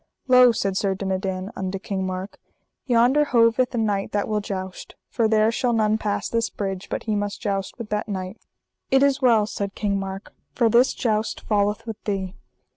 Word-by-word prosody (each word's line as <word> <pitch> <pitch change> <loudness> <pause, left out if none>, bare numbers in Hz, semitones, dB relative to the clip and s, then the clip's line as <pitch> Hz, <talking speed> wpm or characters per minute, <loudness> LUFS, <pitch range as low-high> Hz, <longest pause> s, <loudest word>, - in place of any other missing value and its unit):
Lo, 250 -1 +7
said 195 -4 -1
Sir 195 0 0
Dinadan 190 0 -3
unto 190 0 -3
King 190 -1 -3
Mark, 185 +2 -6 0.5
yonder 250 +4 +4
hoveth 240 -1 +3
a - - -1
knight 205 -3 -1
that 205 -1 0
will 215 -1 0
joust, 190 -2 -6 0.2
for 230 -2 +2
there 220 0 +3
shall 240 +1 0
none 215 -1 +2
pass 205 -2 -2
this 230 -1 0
bridge 195 -2 -5
but - - -3
he 215 -2 -1
must 205 0 -2
joust 195 -3 -3
with 230 -3 -7
that 210 +1 -2
knight. 190 +1 -5 0.5
It 270 +1 +4
is 280 0 +2
well, 230 -5 +4
said 200 -1 -4
King 200 -2 -1
Mark, 195 +1 -6 0.2
for 235 -2 +3
this 245 +3 +4
jousts 220 -3 -1
falleth 205 0 0
with 225 -3 -7
thee. 190 -3 -2
210 Hz, 190 wpm, -23 LUFS, 195-230 Hz, 0.5 s, Lo